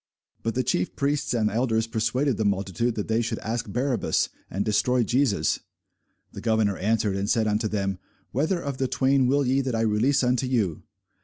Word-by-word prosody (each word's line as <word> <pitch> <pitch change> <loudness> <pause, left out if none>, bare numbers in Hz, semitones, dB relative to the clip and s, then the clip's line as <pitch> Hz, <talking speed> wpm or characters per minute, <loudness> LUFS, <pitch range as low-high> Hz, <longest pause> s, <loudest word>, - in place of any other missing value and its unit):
But 115 - -2
the 130 - +1
chief 90 -6 -1
priests 140 +5 0
and 110 -2 +2
elders 115 0 +1
persuaded 115 +3 0
the 110 - 0
multitude 100 +4 0
that 105 - -3
they 110 +1 +1
should 115 -1 -2
ask 115 +2 -3
Barabbas, 125 0 0 0.2
and 100 +3 -2
destroy 120 +4 +2
Jesus. 120 - +1 0.7
The - - -8
governor 110 -3 +1
answered 105 0 0
and 100 +1 -2
said 115 -1 +2
unto 110 +1 +1
them, 100 -3 -2 0.3
Whether 160 +8 0
of 140 -5 -4
the 130 - +1
twain 130 0 +2
will 140 +2 +2
ye 130 +2 +2
that 130 -3 -2
I 115 - 0
release 115 +6 +2
unto 125 +1 +1
you? 110 - 0
115 Hz, 185 wpm, -25 LUFS, 105-130 Hz, 0.7 s, and